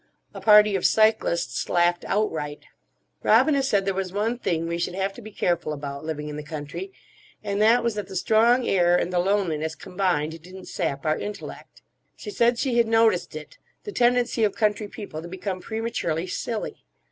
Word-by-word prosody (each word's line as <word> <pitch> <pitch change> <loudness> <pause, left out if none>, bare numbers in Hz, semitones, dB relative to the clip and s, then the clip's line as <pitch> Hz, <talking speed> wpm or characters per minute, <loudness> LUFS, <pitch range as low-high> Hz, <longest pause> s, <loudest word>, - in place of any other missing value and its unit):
A - - -8
party 210 -1 +6
of 190 - -1
cyclists 215 -6 +2
laughed 175 0 +2
outright. 155 -8 -2 0.6
Robina 285 -3 +4
said 205 -8 +1
there 195 - 0
was 190 -1 -3
one 220 +5 -1
thing 165 -7 -1
we 170 0 -3
should 175 +1 -2
have 195 +1 -1
to 240 - -11
be 215 - -9
careful 175 -6 -1
about, 140 -1 -6
living 155 -1 -4
in 150 0 -6
the - - -4
country, 155 - -7 0.5
and 200 0 -1
that 230 +3 +5
was 235 -1 0
that 205 -2 -5
the 190 - -9
strong 230 +6 +3
air 175 -2 +3
and 180 - -2
the 175 - +2
loneliness 170 -5 0
combined 175 -4 -2
didn't 185 +2 -11
sap 140 -6 -3
our 155 0 +1
intellect. 210 0 -8 0.3
She 420 - -8
said 240 -8 +2
she 250 -1 0
had 230 - +3
noticed 225 0 +2
it—the - - -11
tendency 245 - +2
of 205 -2 +1
country 210 0 0
people 200 -7 -8
to 170 - -8
become 185 +1 -5
prematurely 220 -8 -2
silly. 215 +4 -4
195 Hz, 180 wpm, -24 LUFS, 170-220 Hz, 0.6 s, party